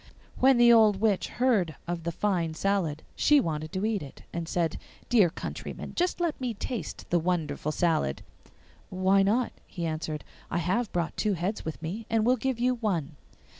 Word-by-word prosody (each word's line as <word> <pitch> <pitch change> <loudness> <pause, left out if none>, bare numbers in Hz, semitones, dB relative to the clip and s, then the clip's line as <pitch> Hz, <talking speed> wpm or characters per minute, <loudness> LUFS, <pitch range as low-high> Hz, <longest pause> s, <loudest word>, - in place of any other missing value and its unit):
When 265 0 +6
the 240 0 +7
old 215 -4 +5
witch 210 -3 +2
heard 215 - +1
of 170 -1 -3
the 170 - 0
fine 170 -3 0
salad 170 -5 0
she 295 -1 +5
wanted 155 - -2
to 190 +2 -1
eat 220 -3 0
it, 140 - -10
and 170 -1 -4
said, 165 -3 0 0.3
'Dear 215 -8 +5
countryman, 160 - -6
just 355 +1 0
let 340 -5 -1
me 245 -3 -2
taste 235 +2 -5
the 175 - +4
wonderful 160 -4 -1
salad.' 155 - 0 0.7
'Why 190 +1 +3
not?' 225 +5 +1
he 175 -4 -4
answered; 155 -1 -3 0.3
'I - - -1
have 185 +7 0
brought 170 -2 -1
two 210 -2 +1
heads 190 +5 -2
with 160 - -5
me, 205 +8 -5
and 225 -1 +2
will 250 +2 +5
give 260 0 -2
you 250 +1 +3
one. 180 - -2
190 Hz, 180 wpm, -28 LUFS, 165-230 Hz, 0.7 s, the